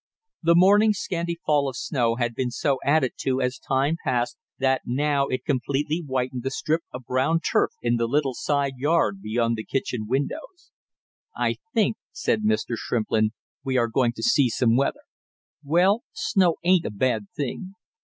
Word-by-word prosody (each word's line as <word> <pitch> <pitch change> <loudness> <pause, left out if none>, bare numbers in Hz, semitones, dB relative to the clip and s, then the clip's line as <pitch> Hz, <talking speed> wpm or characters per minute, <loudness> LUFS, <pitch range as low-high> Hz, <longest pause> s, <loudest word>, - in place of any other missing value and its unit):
The 170 0 +4
morning's 205 +4 +5
scanty 170 -3 -3
fall 145 -2 +2
of 130 - -8
snow 120 -6 0
had 120 -1 -1
been 125 +1 -2
so 130 +2 0
added 140 -2 +2
to 130 -1 0
as 125 0 -1
time 140 +4 0
passed 120 -2 0 0.2
that 130 0 +1
now 140 +2 0
it 130 - -3
completely 145 +4 -1
whitened 130 -3 -2
the 135 - -2
strip 155 +4 -1
of 125 0 -8
brown 130 +7 +1
turf - - +1
in 120 0 +2
the 115 0 0
little 140 +1 +1
side 140 0 -1
yard 145 -9 +1
beyond 115 +2 0
the 110 - -4
kitchen 125 -4 -3
windows. 145 - -4 0.7
"I - - 0 0.2
think," - - +2
said 220 - 0
Mr. 215 - 0
Shrimplin, 110 -1 0 0.3
"we 130 -2 0
are 120 -1 +3
going 120 0 +1
to - - -8
see 145 - +4
some 115 0 +2
weather. 140 +2 0 0.6
Well, 180 +9 +3
snow 185 -6 +2
ain't 180 -1 +3
a - - -2
bad 110 0 -1
thing." 185 +8 -4
135 Hz, 170 wpm, -24 LUFS, 120-160 Hz, 0.7 s, morning's